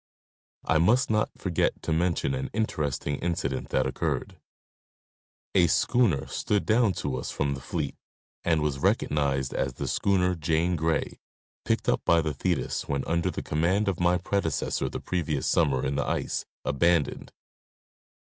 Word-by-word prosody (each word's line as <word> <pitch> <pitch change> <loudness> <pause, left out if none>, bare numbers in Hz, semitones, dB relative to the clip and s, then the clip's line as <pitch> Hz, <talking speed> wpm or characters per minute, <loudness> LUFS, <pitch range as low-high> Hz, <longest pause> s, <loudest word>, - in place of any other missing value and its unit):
I 80 - +3
must 110 - +3
not 105 0 +2
forget 90 -4 0
to 80 - 0
mention 85 +9 +1
an 135 0 -3
interesting 75 - -1
incident 85 -6 -2
that 65 - +1
occurred. 65 - -2 1.1
A 90 -3 +5
schooner 95 - +2
stood 105 -1 -1
down 110 -2 +3
to 70 -6 -3
us 60 - -4
from 70 -1 -1
the 70 - -7
fleet, 75 0 -3 0.5
and 80 -3 +2
was 70 -2 -1
recognized 70 -2 +1
as 65 -1 -1
the - - -4
schooner 90 -2 +2
Jane 85 +2 +1
Grey, 80 0 -1 0.5
picked - - 0
up - - +2
by 85 - +4
the 80 -2 -1
Thetis 65 - -2
when 70 -1 -1
under 85 0 0
the - - -4
command 90 +7 +1
of 95 -3 0
my 90 +1 +3
predecessor 100 +2 -1
the - - -5
previous 80 -6 -2
summer 70 -6 +2
in 70 0 -1
the 70 - -1
ice—abandoned. 80 +1 -1
80 Hz, 150 wpm, -27 LUFS, 70-90 Hz, 1.1 s, A